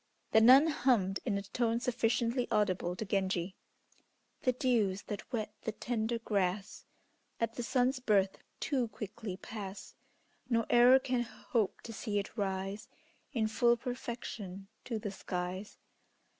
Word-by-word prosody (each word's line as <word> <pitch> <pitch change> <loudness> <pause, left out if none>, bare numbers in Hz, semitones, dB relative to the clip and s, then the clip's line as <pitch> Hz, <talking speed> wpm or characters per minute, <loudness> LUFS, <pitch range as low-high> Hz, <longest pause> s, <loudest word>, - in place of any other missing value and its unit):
The 220 - +6
nun 260 +6 +9
hummed, 245 - +2
in 205 -5 +1
a 200 - -3
tone 230 +3 0
sufficiently 240 0 0
audible 185 -4 +1
to 220 - -4
Genji, 190 -2 -1 0.9
"The 255 - +3
dews 235 -7 +1
that 210 +4 -6
wet 215 -4 -2
the 220 - -3
tender 235 0 -1
grass, 200 -3 -1 0.5
At 230 -1 0
the 245 - -4
sun's 255 +2 +1
birth, 200 -5 +2 0.2
too 260 -5 0
quickly 210 -2 -6
pass, 200 -1 -7 0.6
Nor 230 -2 +2
e'er 245 +2 +8
can 255 -2 0
hope 230 -2 -2
to 230 - -8
see 215 -2 -2
it 200 +1 -3
rise 195 -1 -3 0.4
In 225 -4 +1
full 235 +2 +3
perfection 230 -6 -6 0.2
to 230 - -2
the 210 -2 -4
skies." 185 +1 -4
220 Hz, 140 wpm, -33 LUFS, 195-240 Hz, 0.9 s, nun